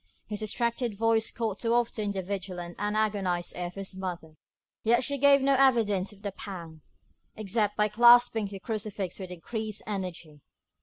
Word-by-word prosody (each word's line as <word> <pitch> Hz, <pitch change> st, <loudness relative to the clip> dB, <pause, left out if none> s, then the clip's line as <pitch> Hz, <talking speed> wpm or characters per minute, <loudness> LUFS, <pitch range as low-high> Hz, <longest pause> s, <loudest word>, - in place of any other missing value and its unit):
His 210 Hz, -1 st, -5 dB
distracted 235 Hz, +1 st, -1 dB
voice 225 Hz, 0 st, +2 dB
caught 220 Hz, -4 st, -3 dB
too 230 Hz, 0 st, +1 dB
often 225 Hz, -3 st, 0 dB
the 190 Hz, -1 st, -3 dB
vigilant 180 Hz, -2 st, -5 dB
and 210 Hz, +1 st, -1 dB
agonised 195 Hz, -5 st, 0 dB
ear 180 Hz, 0 st, -3 dB
of 175 Hz, -, -11 dB
his 195 Hz, -1 st, -6 dB
mother; 175 Hz, -4 st, -6 dB, 0.5 s
yet 235 Hz, +3 st, +3 dB
she 280 Hz, +2 st, 0 dB
gave 280 Hz, 0 st, +6 dB
no 275 Hz, 0 st, +4 dB
evidence 230 Hz, -8 st, +3 dB
of 205 Hz, 0 st, -17 dB
the 200 Hz, -, -3 dB
pang, 170 Hz, -5 st, -9 dB, 0.5 s
except 210 Hz, 0 st, -1 dB
by 210 Hz, 0 st, +4 dB
clasping 235 Hz, 0 st, +6 dB
her 195 Hz, 0 st, -7 dB
crucifix 205 Hz, -3 st, -4 dB
with 185 Hz, -2 st, -6 dB
increased 215 Hz, +4 st, -4 dB
energy. 175 Hz, -7 st, -5 dB
210 Hz, 165 wpm, -28 LUFS, 185-225 Hz, 0.5 s, gave